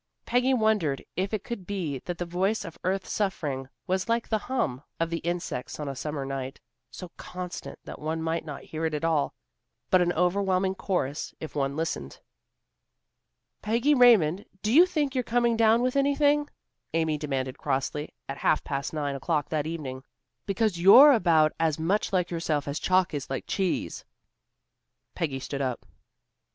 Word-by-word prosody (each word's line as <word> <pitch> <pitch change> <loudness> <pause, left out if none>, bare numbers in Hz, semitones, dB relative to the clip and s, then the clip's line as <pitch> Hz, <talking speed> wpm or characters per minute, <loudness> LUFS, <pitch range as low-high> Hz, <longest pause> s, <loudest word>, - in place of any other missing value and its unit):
Peggy 250 +2 +2
wondered 215 - +1
if 190 +2 -1
it 215 -3 -2
could 220 -7 -6
be 170 -9 -3
that 175 -1 -4
the 175 - -3
voice 190 +5 0
of 165 - -8
earth's 190 +1 -1
suffering 145 -10 -2 0.2
was 190 +3 -1
like 230 0 +1
the 220 - 0
hum 205 - -2 0.2
of 165 0 0
the 165 - -1
insects 170 -8 -4
on 150 - -4
a 135 - -4
summer 145 0 -4
night, 135 -1 -5 0.3
so 180 +5 -9
constant 180 -1 -7
that - - -8
one 160 +2 -2
might 165 +1 -1
not 150 -3 -7
hear 160 +1 -6
it 160 -1 0
at 150 - -4
all, 155 -3 +1 0.6
but 185 - +6
an 175 0 +2
overwhelming 190 +2 +1
chorus 170 -7 -2
if 160 - -7
one 140 -1 0
listened. 155 - -3 1.4
"Peggy 235 +7 +2
Raymond, 210 - +5 0.2
do 215 +2 +1
you 345 +6 +8
think 295 -6 -1
you're 255 -2 0
coming 235 0 +2
down 225 +1 +4
with 255 +1 0
anything?" 285 +1 +3 0.5
Amy 160 -2 +1
demanded 135 -3 -3
crossly, 145 +2 -2 0.2
at 135 0 -5
half 155 - +2
past 140 +1 -3
nine 145 -2 -1
o'clock 145 +1 -1
that 155 -1 -1
evening. 135 -6 -5 0.4
"Because 200 -2 0
you're 255 +11 +10
about 165 - +4
as 160 -2 +1
much 180 +6 0
like 180 -2 0
yourself 160 -4 -1
as 140 +1 -2
chalk 185 -2 +2
is 145 -2 -4
like 135 - -3
cheese." 190 -3 -2 1.1
Peggy 145 -6 -2
stood 140 +1 -4
up. 130 -3 -2
170 Hz, 170 wpm, -27 LUFS, 150-210 Hz, 1.4 s, you're